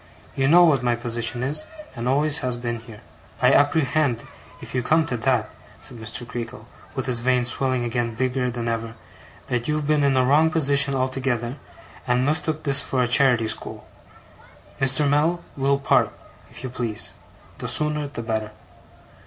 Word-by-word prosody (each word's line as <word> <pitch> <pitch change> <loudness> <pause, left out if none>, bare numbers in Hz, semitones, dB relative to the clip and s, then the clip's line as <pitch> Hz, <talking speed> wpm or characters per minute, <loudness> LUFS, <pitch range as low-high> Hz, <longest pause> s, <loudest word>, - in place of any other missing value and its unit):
'You 135 0 +1
know 175 +4 +7
what 150 -6 +4
my 120 -1 +1
position 120 0 -2
is, 150 +4 -2 0.3
and 120 0 -4
always 145 +4 +2
has 125 -1 -2
been, 120 -1 -3
here.' 115 -2 -13 0.4
'I - - +4
apprehend, 145 -3 +2 0.4
if - - -10
you 125 - +1
come 155 +6 +2
to 125 - -2
that,' 120 -2 0 0.3
said 120 - -9
Mr. 110 +2 -4
Creakle, 115 -3 -6 0.3
with 130 - -2
his 125 -3 0
veins 125 0 +1
swelling 130 -1 0
again 120 -1 -2
bigger 130 +1 0
than 120 -1 -4
ever, 115 0 -3 0.5
'that 120 -1 -2
you've 150 -1 0
been 150 0 +2
in 140 -2 +3
a 130 - +4
wrong 150 +5 +4
position 140 -4 +3
altogether, 130 -1 -1 0.5
and 125 +1 +2
mistook 155 +1 0
this 140 -1 +2
for 130 -1 0
a - - +1
charity 125 -2 +4
school. - - -5 0.9
Mr. 135 +2 +2
Mell, 155 +5 +2 0.2
we'll 140 0 +2
part, 140 - +2 0.4
if - - -11
you 130 - -5
please. 115 -4 -2 0.5
The - - -4
sooner 150 -1 0
the 130 -4 -6
better. 110 -1 -3
130 Hz, 170 wpm, -23 LUFS, 120-145 Hz, 0.9 s, know